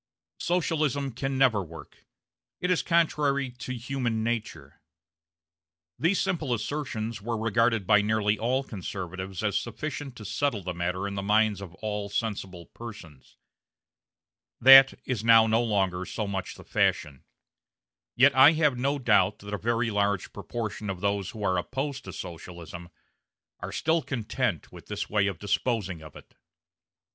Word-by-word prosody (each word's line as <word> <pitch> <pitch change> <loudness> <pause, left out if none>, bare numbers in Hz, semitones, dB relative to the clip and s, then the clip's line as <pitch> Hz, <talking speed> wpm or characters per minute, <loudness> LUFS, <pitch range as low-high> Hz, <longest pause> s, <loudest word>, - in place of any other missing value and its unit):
Socialism 155 -6 0
can 135 +3 -3
never 125 -6 +4
work; 80 -4 -12 0.5
it 180 - 0
is 180 - +2
contrary 145 -5 +1
to 125 +1 -6
human 120 -2 -2
nature 115 -1 -4 1.2
these 170 +5 +2
simple 150 -8 0
assertions 115 -4 -4
were 115 +2 -3
regarded 115 -1 +1
by 105 +2 +5
nearly 105 0 +1
all 130 +4 0
conservatives 95 -3 -6
as 105 -1 +1
sufficient 140 +2 -6
to 110 - -10
settle 110 0 -1
the 90 0 -3
matter 90 +3 -2
in 100 - -5
the 100 - -3
minds 105 0 +2
of 90 -3 -9
all 105 -1 -3
sensible 100 -5 -4
persons 90 - -12 1.2
That 135 +1 +9
is 120 -5 -2
now 115 -1 +7
no 110 +1 +2
longer 95 -5 0
so 110 - -3
much 95 -2 -4
the - - -13
fashion; 70 -3 0 0.9
yet 140 +3 +6
I 135 +4 +8
have 150 -4 +2
no 140 +3 +1
doubt 105 -7 +3
that 105 +1 -9
a - - 0
very 115 0 0
large 100 -2 0
proportion 110 -3 -5
of 95 -2 -4
those 100 -2 0
who 110 -1 -7
are 95 -2 +2
opposed 135 +7 -4
to 95 - -7
Socialism 85 0 -8 0.7
are - - -6
still 160 +1 +1
content 125 -6 -2
with - - -13
this - - -4
way 100 -1 +2
of 95 -4 -3
disposing 100 -3 -1
of 75 -2 -12
it. - - -15
110 Hz, 150 wpm, -27 LUFS, 100-130 Hz, 1.2 s, That